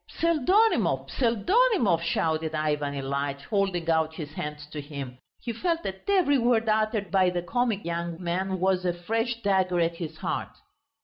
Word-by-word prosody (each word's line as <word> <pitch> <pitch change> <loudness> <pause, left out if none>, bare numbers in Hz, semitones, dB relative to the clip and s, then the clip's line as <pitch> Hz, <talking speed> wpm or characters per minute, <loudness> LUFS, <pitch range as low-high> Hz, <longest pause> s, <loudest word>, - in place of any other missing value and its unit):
"Pseldonimov, 335 - +2
Pseldonimov," 240 - +2
shouted 160 -1 0
Ivan 150 -2 -1
Ilyitch, 140 +1 -3
holding 190 -2 -1
out 160 -1 +1
his 150 -3 -7
hands 150 -1 -5
to 150 - -5
him. 140 -4 -7 0.2
He 235 - -4
felt 335 +7 -1
that 190 - -6
every 345 -9 +4
word 230 -1 +2
uttered 215 -2 +1
by 190 -2 +4
the 175 -1 -2
comic 225 0 -1
young 170 0 -3
man 185 +2 -2
was 185 0 +1
a 175 -1 +1
fresh 225 +7 -2
dagger 190 -3 +2
at 170 0 0
his 160 -2 -6
heart. - - -4
180 Hz, 160 wpm, -27 LUFS, 160-230 Hz, 0.2 s, every